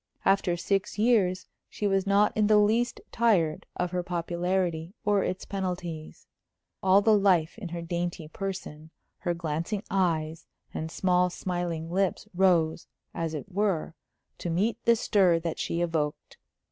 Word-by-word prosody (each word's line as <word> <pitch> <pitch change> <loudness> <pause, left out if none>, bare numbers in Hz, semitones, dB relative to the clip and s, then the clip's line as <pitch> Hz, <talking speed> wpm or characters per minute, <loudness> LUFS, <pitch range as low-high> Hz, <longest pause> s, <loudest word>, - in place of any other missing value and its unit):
After 195 -2 +2
six 195 +3 -1
years 200 -6 +2 0.2
she 210 - -4
was 195 -1 +1
not 200 +1 +3
in 210 -1 +3
the 215 0 +5
least 225 +4 +2
tired 190 -10 +2
of 180 -1 -2
her 180 -1 -1
popularity 175 0 -2
or 205 -1 +3
its 185 - -3
penalties. 175 -5 -5 0.6
All 190 +2 +5
the 220 0 +5
life 185 -5 +3
in 190 -6 -6
her 170 0 -5
dainty 170 -1 -3
person, 160 -3 -6 0.3
her 175 -1 -1
glancing 170 +5 -3
eyes, 165 -4 0 0.3
and 160 - -4
small, 180 +1 +2
smiling 175 -3 -3
lips 195 +2 0
rose, 175 -3 +2 0.3
as 165 -1 -3
it 175 +7 -7
were, 190 -5 0 0.5
to 175 - -3
meet 195 +8 0
the 235 - +6
stir 190 -6 +3
that 165 -1 -4
she 170 - -1
evoked. 160 -4 -2
180 Hz, 145 wpm, -28 LUFS, 165-195 Hz, 0.6 s, the